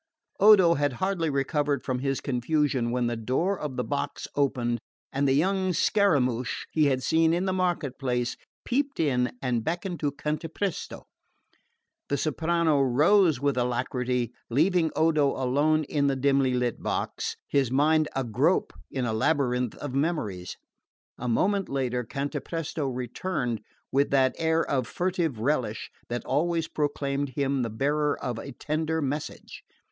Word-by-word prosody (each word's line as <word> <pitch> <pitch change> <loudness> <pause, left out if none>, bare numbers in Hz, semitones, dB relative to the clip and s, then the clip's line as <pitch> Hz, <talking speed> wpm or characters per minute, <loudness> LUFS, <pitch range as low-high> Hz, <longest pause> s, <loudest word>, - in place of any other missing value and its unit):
Odo 195 -4 +7
had 145 -3 0
hardly 180 +2 -1
recovered 140 +1 0
from 130 -2 -2
his 135 0 -1
confusion 130 -1 0
when 125 0 0
the 120 0 -1
door 130 - 0
of 145 -4 -4
the 125 - 0
box 145 +1 -3
opened 120 -4 0 0.3
and 140 +1 +1
the 135 - +3
young 185 +4 +1
Scaramouch 140 - +1
he 155 -1 +3
had 130 -2 +1
seen 165 +2 +3
in 180 +2 0
the 190 - 0
market 175 -8 -1
place 125 -2 -1 0.3
peeped 280 +3 -1
in 125 -5 +1
and 120 -3 0
beckoned 175 - -3
to 145 -2 0
Cantapresto. 155 +6 -4 1.1
The 140 - +1
soprano 160 +1 +1
rose 155 +6 +4
with 140 0 +1
alacrity, 125 0 -1 0.2
leaving 165 +6 +3
Odo 155 -3 +3
alone 145 +5 +2
in 145 -1 0
the 135 - +1
dimly 135 -1 +2
lit 125 -2 -1
box, - - -2
his 135 -4 +1
mind 155 +4 +3
agrope 120 -5 +1 0.2
in 130 -2 -2
a 110 - -1
labyrinth 125 -1 +1
of 145 -3 -6
memories. 130 - -2 0.6
A 125 - -4
moment 195 - +1
later 125 -2 -1
Cantapresto 145 +4 -3
returned 125 - -3 0.3
with 140 +2 +2
that 130 -1 +3
air 160 0 +1
of 130 -4 0
furtive 175 -8 -1
relish 120 -3 -1 0.2
that 120 0 -3
always 165 +1 0
proclaimed 140 -2 -2
him 140 -2 0
the 115 - -1
bearer 145 +6 0
of 120 -2 -3
a 140 - -7
tender 160 +4 -2
message. 145 0 -4
140 Hz, 145 wpm, -27 LUFS, 125-160 Hz, 1.1 s, Odo